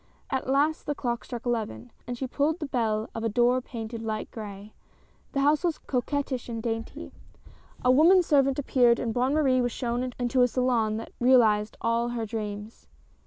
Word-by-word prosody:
At 265 -1 -2
last 290 +4 +1
the 290 - -1
clock 240 -3 -3
struck 240 -1 -7
eleven, 210 - -3 0.2
and 245 0 -4
she 265 - -3
pulled 290 +5 0
the 320 - -4
bell 220 -5 -1
of 225 - -5
a 225 - +1
door 245 +3 +3
painted 230 -2 -7
light 220 -1 -4
gray. 205 -1 -8 0.6
The 275 - +1
house 295 +4 +3
was 340 -3 0
coquettish 260 -1 -2
and 230 -1 -5
daint3^ 225 -1 -4 0.7
A 250 - +6
woman 340 +7 +6
servant 275 -4 +3
appeared, 245 -4 +3
and 230 -3 -2
Bonne 255 +4 +1
Marie 265 -4 +3
was 245 0 0
shown 245 +2 -2
into 250 +1 +1
a 245 - +6
salon 240 -4 +1
that 225 - -7
realized 225 -4 +4
all 230 +1 +1
her 235 -2 -3
dreams. 210 0 -6
245 Hz, 180 wpm, -27 LUFS, 225-265 Hz, 0.7 s, A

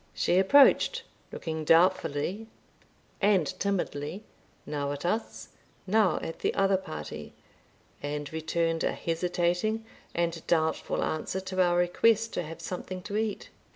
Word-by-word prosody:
She 180 - +2
approached, 275 +9 +5 0.3
looking 160 -2 -4
doubtfully 180 +4 +2 0.7
and 195 -5 +4
timidly, 185 -2 -2 0.4
now 145 -1 -2
at 145 +3 -6
us, 220 +6 -2 0.4
now 200 -3 +3
at 165 - -5
the - - -1
other 195 0 +3
party, 155 - -6 0.7
and 145 0 -4
returned 165 +1 -1
a - - +1
hesitating 180 +6 -1 0.3
and 170 -1 -1
doubtful 160 -2 +1
answer 155 +4 -2
to 185 0 -1
our 175 -1 +3
request 220 +6 +2
to - - -1
have 165 0 -8
something 185 +1 -5
to 205 - -5
eat. 215 -2 -2
175 Hz, 125 wpm, -28 LUFS, 160-195 Hz, 0.7 s, approached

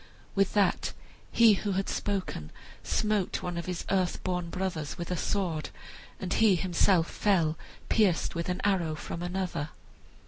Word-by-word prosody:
With 195 -1 +2
that 200 -3 +2 0.4
he 230 -2 +7
who 200 0 -1
had 195 +1 -1
spoken 190 - -2 0.3
smote 210 -3 0
one 175 -1 -3
of 170 +1 -4
his 180 -1 -3
earth 185 -2 +1
born 180 -2 -1
brothers 170 -5 -3
with 170 +1 -5
a - - +1
sword, 170 -3 -1 0.5
and 185 -1 -2
he 220 -4 +5
himself 175 -1 +3
fell 170 -7 +2 0.3
pierced 200 -7 +2
with 170 +1 -3
an 180 - -1
arrow 175 -6 +1
from 170 +2 -6
another. 175 -4 -2
180 Hz, 150 wpm, -29 LUFS, 170-195 Hz, 0.5 s, he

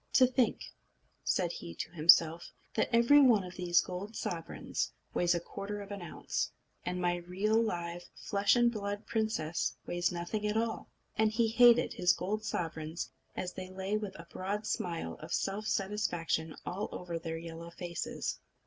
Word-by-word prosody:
"To 255 - +7
think," 255 -1 +1 0.6
said 175 -3 +1
he 85 - -7
to 160 - -5
himself, 165 0 +5 0.2
"that - - +1
every 235 +5 +7
one 235 -7 +6
of 180 0 -8
these 175 -1 +3
gold 195 +4 -6
sovereigns 165 -5 -3 0.2
weighs 175 0 +3
a - - +1
quarter 200 +4 -6
of 200 0 -8
an 200 -2 -5
ounce, 170 - -2 0.3
and 180 0 -2
my 175 0 +1
real, 195 +6 +1
live, 175 -5 -3
flesh 200 +2 +2
and 240 -1 +4
blood 205 -1 -4
princess 215 -8 -1
weighs 175 0 0
nothing 180 +5 -2
at 210 +1 0
all!" 225 0 -1 0.3
And 220 0 +5
he 225 0 +2
hated 240 +1 +6
his 180 0 +4
gold 210 +4 -2
sovereigns, 160 -4 -3 0.3
as 180 0 -3
they 185 0 -6
lay 190 +2 -2
with 210 -2 -3
a 165 - -9
broad 205 +3 -3
smile 170 - -2
of - - -9
self 205 +2 -2
satisfaction 175 -6 -1
all 200 +4 -3
over 175 -2 -4
their 165 0 -4
yellow 165 0 -7
faces. 170 0 -4
185 Hz, 165 wpm, -32 LUFS, 170-215 Hz, 0.6 s, To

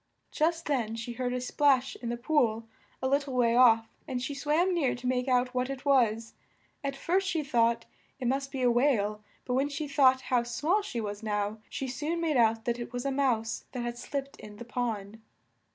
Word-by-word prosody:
Just 330 +2 0
then 235 -6 -1
she 230 +1 -5
heard 250 +1 -2
a 250 - -1
splash 270 0 +2
in 235 - -5
the 240 - -2
pool 235 -4 +1 0.4
a - - +2
lit 280 +2 +3
tle 275 -2 -6
way 235 -2 +3
off, 225 -2 +6 0.2
and 255 - -2
she 260 +3 -3
swam 305 +6 +1
near 305 -7 +1
to 245 - -10
make 250 0 0
out 250 0 +2
what 250 +1 -1
it 275 +1 -6
was; 230 -5 +2 0.5
at 275 -1 -2
first 375 +7 0
she 330 -6 0
thought 235 -3 +2 0.3
it 250 - -2
must 275 +2 -1
be 265 -2 -3
a 245 - +5
whale, 215 -5 +1 0.2
but 250 - -2
when 270 +3 +1
she 295 +1 -4
thought 265 -2 +4
how 250 -2 +1
small 295 - 0
she 275 - -5
was 205 -1 -4
now, 210 0 -2
she 270 - -4
soon 300 +6 -2
made 325 -3 0
out 225 -2 +3
that 240 0 -1
it 235 - -6
was 245 +1 -4
a 275 - +1
mouse 245 -5 0
that 250 -2 -3
had 240 0 -3
slipped 275 +1 -5
in 210 0 -10
the 240 - -8
pond. 225 -3 -3
250 Hz, 215 wpm, -29 LUFS, 235-280 Hz, 0.5 s, off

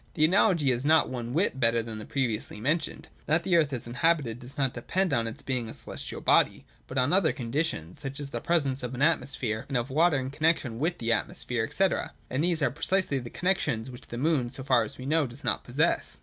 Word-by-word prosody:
The 155 - +4
analogy 170 -5 +3
is 125 +1 -1
not 155 +1 +4
one 120 -2 -4
whit 155 -2 +1
better 115 -2 +3
than 110 -1 -6
that 105 - -9
previously 115 -6 -2
mentioned. 155 +9 -1 0.2
That 160 +2 +2
the 180 -1 +2
earth 155 -4 +3
is 125 -3 -3
inhabited 125 -1 +1
does 130 +5 -11
not 135 -3 +1
depend 180 +8 -1
on 115 -3 +1
its 115 - -7
being 125 -4 -1
a - - -8
celestial - - -6
body, - - +3 0.2
but 130 - -6
on 130 +5 +2
other 185 -4 +4
conditions, 120 - -3
such 135 0 -5
as 140 -1 -4
the - - -3
presence 140 -6 +1
of 125 0 -4
an 130 - 0
atmosphere, 130 -8 0
and 135 - -1
of 120 +2 -3
water 160 +2 +4
in 130 0 -3
connexion 145 -6 0
with 170 +5 0
the 115 0 +2
atmosphere, 115 0 -2
&c.: 195 - +3 0.4
and 130 +4 0
these 170 -3 +1
are - - +2
precisely 165 -1 0
the 120 -2 -7
conditions 130 -11 -1
which 125 - -11
the 120 - -6
moon, 140 -3 +1
so 135 +1 -7
far 130 -3 +4
as 110 - -5
we 130 - -8
know, 155 0 +2
does 120 +4 -12
not - - +1
possess. 120 - 0
135 Hz, 230 wpm, -28 LUFS, 120-160 Hz, 0.4 s, The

